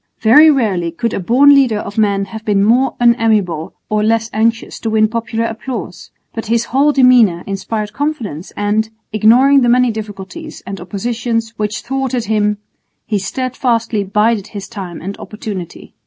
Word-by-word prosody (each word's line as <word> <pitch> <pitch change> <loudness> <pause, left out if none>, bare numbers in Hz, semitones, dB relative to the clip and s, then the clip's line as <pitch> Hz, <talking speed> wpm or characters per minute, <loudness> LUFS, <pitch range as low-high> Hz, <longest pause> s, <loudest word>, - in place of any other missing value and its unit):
Very 295 +9 +7
rarely 205 - +1
could 205 +7 -3
a - - -2
born 255 +9 +5
leader 260 -6 +3
of 205 -1 -6
men 200 -2 +1
have 220 +3 -9
been 205 -2 +1
more 245 +5 +2
unamiable 220 -9 +1
or 215 0 0
less 225 +1 0
anxious 225 +1 -1
to 225 - -3
win 215 0 +3
popular 230 0 -2
applause, 225 -5 -6 0.2
but 225 -1 -5
his 235 +1 +1
whole 280 +4 +2
demeanour 250 -10 +4
inspired 210 +2 -4
confidence 235 - -4
and, 210 +2 0 0.2
ignoring 250 +6 +5
the 240 - +2
many 250 0 +3
difficulties 205 -4 -8
and 195 -2 -7
oppositions 225 +4 -3
which 210 -1 -3
thwarted 260 -1 -2
him, 210 -1 0 0.5
he 210 -2 -1
steadfastly 230 0 -1
bided 210 +1 0
his 200 -2 -8
time 185 -5 -8
and 200 +2 -5
opportunity. 205 -5 -8
220 Hz, 155 wpm, -16 LUFS, 205-240 Hz, 0.5 s, Very